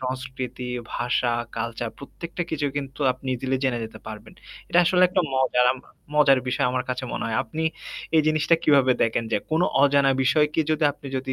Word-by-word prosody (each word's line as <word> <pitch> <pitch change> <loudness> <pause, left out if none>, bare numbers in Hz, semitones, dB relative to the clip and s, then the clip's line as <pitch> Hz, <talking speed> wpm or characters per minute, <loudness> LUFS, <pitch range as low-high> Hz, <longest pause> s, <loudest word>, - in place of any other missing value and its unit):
সংস্কৃতি, 130 -1 -5 0.3
ভাষা, 120 0 0 0.2
কালচার 115 0 -3
প্রত্যেকটা 170 +5 -6
কিছু 145 -2 -1
কিন্তু 140 0 -5
আপনি 130 +1 -6
দিলে 135 0 0
জেনে 125 -3 +1
যেতে 110 0 -10
পারবেন। 110 0 -9 0.4
এটা 175 - +3
আসলে 180 +1 +3
একটা 185 +1 +1
মজার 130 -1 +2
আমা 130 - -13 0.3
মজার 145 -3 +5
বিষয়। 140 +2 +1
আমার 125 0 -1
কাছে 125 0 -3
মনে - - -3
হয়। 115 - -1
আপনি 155 +8 -5 0.5
এই - - +7
জিনিসটা 155 +1 +3
কিভাবে 140 -5 +4
দেখেন? 115 0 0
যে - - +3
কোন 160 +1 +2 0.2
অজানা 140 -1 +4
বিষয়কে 150 +4 +2
যদি 155 0 +1
আপনি 140 - -14
যদি 130 0 -3
130 Hz, 180 wpm, -24 LUFS, 125-150 Hz, 0.5 s, এই